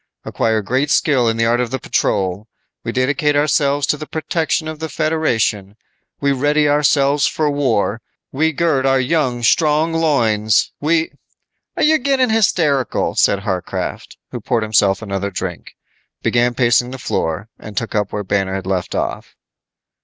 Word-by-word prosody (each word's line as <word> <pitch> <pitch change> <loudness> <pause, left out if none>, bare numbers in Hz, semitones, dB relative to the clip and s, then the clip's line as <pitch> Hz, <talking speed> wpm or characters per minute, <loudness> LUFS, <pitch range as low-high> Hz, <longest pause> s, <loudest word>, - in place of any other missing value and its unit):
Acquire 110 -2 0
great 130 +7 0
skill 130 -7 +2
in 115 - -1
the 115 - +2
art 120 +2 +2
of 125 - -2
the 130 - -2
patrol. 100 -4 -1 0.4
We - - -3
dedicate 145 +3 +1
ourselves 145 -1 +2
to 150 - 0
the 155 0 -8
protection 160 -1 -2
of 155 -1 -6
the 160 0 -4
Federation. 125 -11 -1 0.4
We 140 0 +1
ready 145 +3 +2
ourselves 145 -1 +3
for 150 -2 0
war. 115 -6 0 0.3
We 160 +4 +1
gird 145 -4 +1
our 135 0 +3
young, 130 -3 0
strong 155 +6 +2
loins, 110 -10 +2
we 160 +2 +1 0.3
" - - -51
"You're 315 +1 +4
getting 260 -2 +1
hysterical," 160 - +1
said 100 0 +1
Warcraft, 90 -1 -4
who - - -6
poured 115 -2 0
himself 105 -2 +2
another 100 -1 -3
drink, 90 -2 -6 0.5
began 120 0 +1
pacing 120 0 +2
the 130 - -7
floor 100 -4 -3
and 105 -1 -11
took 115 - -2
up 105 -2 -1
where 105 - -3
Banner 95 -1 -1
had 95 -1 -5
left 95 -2 -2
off. - - -4
130 Hz, 160 wpm, -18 LUFS, 110-150 Hz, 0.5 s, You're